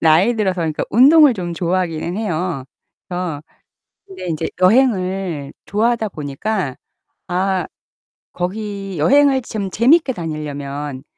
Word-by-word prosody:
나이 165 +9 +4
들어서 190 -4 0
그러니까 160 -2 -1
운동을 285 +4 +7
좀 175 -4 -4
좋아하기는 175 0 -1
해요. 175 -8 -2 0.5
어 175 -5 -3 0.7
근데 380 - -9
인제 160 -1 -2
여행을 185 - +2
좋아하다 220 +1 0
보니까 150 +1 -3 0.5
아 185 0 0 0.7
거기 195 0 -4
여행을 275 - +4
좀 210 -4 -4
재밌게 265 - +4
다니려면 145 - -5
185 Hz, 265 characters per minute, -19 LUFS, 160-220 Hz, 0.7 s, 운동을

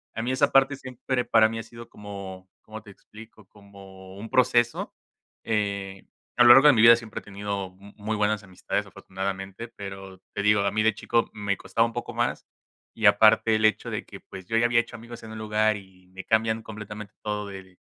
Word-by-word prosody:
a 115 - -3
mí 125 - -1
esa 140 +2 +2
parte 135 +1 +4
siempre 130 -1 -4
para 110 -2 +5
mí 115 +1 -5
ha - - -6
sido 115 +1 -12
como 95 -2 -10
¿cómo 110 0 -10
te 105 - -16
explico? 110 +2 -15
Como 95 -2 -15
un 110 +3 -8
proceso, 120 -2 +1 0.5
eh, 100 -3 -3 0.3
a 120 - +6
lo 120 - +7
largo 135 +3 +7
de 145 - +8
mi 110 - +3
vida 115 0 +9
siempre 115 -2 -7
he - - -19
tenido 100 -1 -5
mu 100 +3 -17
muy 110 +1 -3
buenas 105 0 0
amistades, 95 -2 -4
afortunadamente, 95 +3 -6
pero 95 -4 -10
te 105 - -3
digo, 105 0 +3
a 100 0 0
mí 110 +2 0
de 110 -1 +2
chico 115 +2 0
me 100 -2 -2
costaba 115 +4 0
un 115 - -5
poco 120 -1 -6
más 120 +1 -2 0.5
y 110 -2 +3
aparte 110 +2 +5
el 110 0 +2
hecho 110 - +1
de - - -4
que, - - -12
pues, 95 -1 -11
yo 115 - -2
ya 115 +1 +3
había 120 0 +3
hecho 120 0 -4
amigos 120 0 -10
en 110 - -10
un 110 - -8
lugar 110 0 +1
y 95 -2 -14
me 95 +1 -10
cambian 110 +1 0
completamente 105 -1 -9
todo 105 -1 -3
del 95 -2 -11
105 Hz, 215 wpm, -25 LUFS, 100-115 Hz, 0.5 s, vida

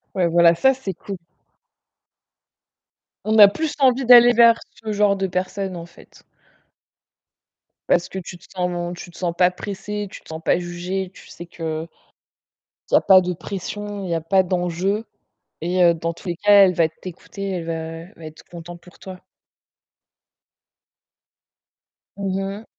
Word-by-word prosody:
Ouais, 180 -3 +2
voilà, 170 0 +5
ça, 265 +10 +3
c'est 250 -7 -6
cool. 195 +2 -8 2.1
On 215 +1 +1
a 205 - +11
plus 305 +10 -3
envie 265 -1 +3
d'aller 240 0 +8
vers 235 0 +5 0.2
ce 220 - -3
genre 205 -1 +2
de 195 0 -2
personne 185 +1 -3
en 170 - -8
fait. 170 - -19 1.7
Parce 175 - +2
que - - -7
tu 180 -1 -8
te - - -20
sens 175 -1 -3
tu 175 - -10
te - - -16
sens 175 -2 -2
pas 180 0 +4
pressé, 205 +2 -6
tu - - -11
te - - -19
sens 160 0 -7
pas - - +2
jugé, 180 +2 -4
tu - - -16
sais 175 - -10
qu'il 160 -2 -5 1.0
y - - +4
a - - +5
pas 190 -1 +6
de 180 0 -3
pression, 205 +3 -6
il - - -6
y - - +1
a 165 - -1
pas 190 +4 +2
d'enjeu 180 +4 -2 0.6
et 175 +1 +3
dans 165 0 -4
tous 170 - -13
les 170 - -2
cas, 205 +1 +6
elle 185 - +1
va 165 -2 +2
t'écouter, 185 +4 -8
elle 175 -3 -4
va 165 - -3
elle 165 +3 -7
va 165 - -12
être 155 0 -12
content 175 0 -10
pour 180 +1 -19
toi. 185 -1 -10 3.0
Mmh 195 -1 -2 0.2
mh. 225 - -16
185 Hz, 165 wpm, -21 LUFS, 170-200 Hz, 3.0 s, a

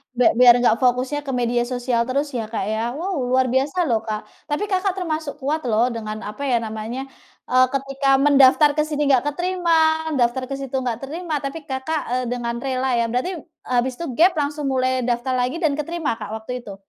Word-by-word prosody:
bia 245 -1 +4
biar 245 -1 +9
nggak 225 - +5
fokusnya 255 +3 +1
ke - - -1
media 240 0 +1
sosial 245 -1 0
terus 280 +3 0
ya, 225 - -3
Kak, 220 - -2
ya? 220 - -1 0.2
Wow 365 +4 -3
luar 260 0 +3
biasa 275 +6 0
loh, 230 -3 +2
Kak. 215 0 -2 0.3
Tapi 295 +6 -1
Kakak 380 0 +1
termasuk 315 -5 -3
kuat 300 +4 -1
loh, 225 +1 +3
dengan 215 -1 -5
apa 245 +7 -7
ya - - +4
namanya, 220 +3 -5 0.5
eee, 255 0 +6
ketika 275 0 -2 0.2
mendaftar 280 +1 +6
ke 300 - +3
sini 295 -1 -2
nggak 255 -1 +4
keterima, 355 +1 -1 0.5
daftar 240 +2 +1
ke 275 - -2
situ 270 -1 -5
nggak 240 -3 -2
terima, 325 +4 -5
tapi 275 +4 -4
Kakak, 270 +4 -2
eee, 250 0 0
dengan 235 -1 -2
rela 260 0 -1
ya. 235 - +2
Berarti 255 +10 -1 0.4
habis 250 +1 +1
itu 340 - -3
gap, 355 +4 +6
langsung 295 0 -2
mulai 255 0 +1 0.2
daftar 240 +2 -1
lagi 250 +4 -1
dan 295 -3 +3
keterima 330 +1 -2
Kak, 210 -1 -6
waktu 220 +3 -7
itu? 200 - -8
260 Hz, 200 wpm, -22 LUFS, 240-295 Hz, 0.5 s, biar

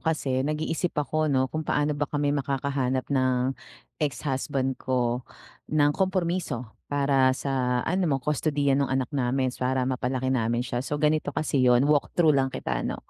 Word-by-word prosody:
kasi 140 -5 0
nag-iisip 155 +5 -2
ako 155 +2 0
'no, 130 -2 +2
kung 155 - -1
paano 150 -1 0
ba 145 0 -2
kami 145 -1 0
makakahanap 135 -2 -1
ng, 130 -1 +2 0.5
ex-husband 135 -1 -1
ko, 125 -1 0 0.5
ng 145 -1 +3
kompromiso, 170 - -1 0.2
para 135 -2 +2
sa 125 -3 0
ano 180 +1 +1
mo 140 - +2
kustodiya 145 +1 0
nung 140 0 +2
anak 130 +1 -1
namin, 130 -1 0
para 130 0 0
mapalaki 130 0 -1
namin 120 -1 0
siya 120 0 -2
so 145 +3 -3
ganito 150 0 +1
kasi 150 -3 +1
yun, 125 0 +5
walk 145 0 +2
through 160 -3 +5
lang 135 -2 +2
kita - - -3
'no. - - -3
135 Hz, 160 wpm, -26 LUFS, 130-150 Hz, 0.5 s, yun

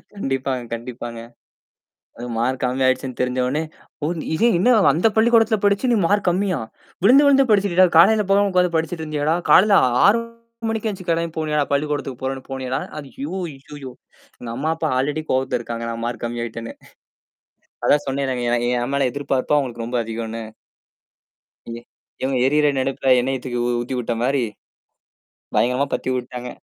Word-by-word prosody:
கண்டிப்பாங்க, 135 -6 -2
கண்டிப்பாங்க. 120 0 -6 1.0
அதும் 120 -1 -6
மார்க் 125 +2 -1
கம்மியாயிடுச்சுன்னு 130 0 0
தெரிஞ்சவுடனே, 125 +4 0 0.4
ஓ, - - +1 0.3
இதே 230 +8 +3
என்ன 245 +7 +4 0.2
அந்தப் 200 +8 +1
பள்ளிக்கூடத்துல 225 -1 +4
படிச்சு 205 +5 +2
நீ - - +3
மார்க் 200 -1 +1
கம்மியா? 185 -1 0 0.5
விழுந்து 270 +7 +7
விழுந்து 275 -2 +4
படிச்சிட்டுடா, 195 -3 +4
காலையில 215 +4 +6
போகாம 200 0 +3
உட்கார்ந்து 180 -2 +2
படிச்சிட்டு 160 0 -2
இருந்தியாடா? 150 +1 0 0.2
காலையில 200 +1 +6 0.3
6 225 +3 +4 0.5
மணிக்கே 225 0 -2
எந்திருச்சு 190 -2 -8
கிளம்பி 165 -1 0
போனியாடா 150 -2 0
பள்ளிக்கூடத்துக்கு 140 -3 -2
போறேன்னு 130 0 -3
போனியாடா? 130 -1 -3 0.2
ஐயோ, 260 - -7 0.2
ஐயையோ. 135 -1 -10 0.5
எங்க 120 - -7
அம்மா, 150 +4 -2
அப்பா 160 -1 -1
ஆல்ரெடி 150 +4 -1
கோவத்துல 130 -1 0
இருக்காங்க, 115 0 -6
நான் 115 0 -5
மார்க் 120 -1 -4
கம்மி 120 0 -3
ஆயிட்டேன்னு. 115 0 -7 1.1
அதான் 145 0 +3
சொன்னேன்லங்க, 130 -2 -2
என் 120 0 +1 0.2
என் 125 - -3
மேல 140 -2 +2
எதிர்பார்ப்பு 140 +1 -1
அவங்களுக்கு 120 -4 -3
ரொம்ப 120 0 -1
அதிகன்னு. 115 0 -5 1.3
எ 120 - -8 0.4
இவங்க 130 0 0
எரியிற 150 +2 +3
நெருப்புல 130 0 -1
எண்ணெய 130 +2 -1
தூக்கி 120 -2 -4
உ - - 0
ஊத்திவிட்ட 120 -1 -3
மாரி 130 0 +1 1.1
பயங்கரமா 125 +5 +2
பத்தி 130 - -2
வுட்டாங்க. 125 0 -5
135 Hz, 145 wpm, -21 LUFS, 125-175 Hz, 1.3 s, விழுந்து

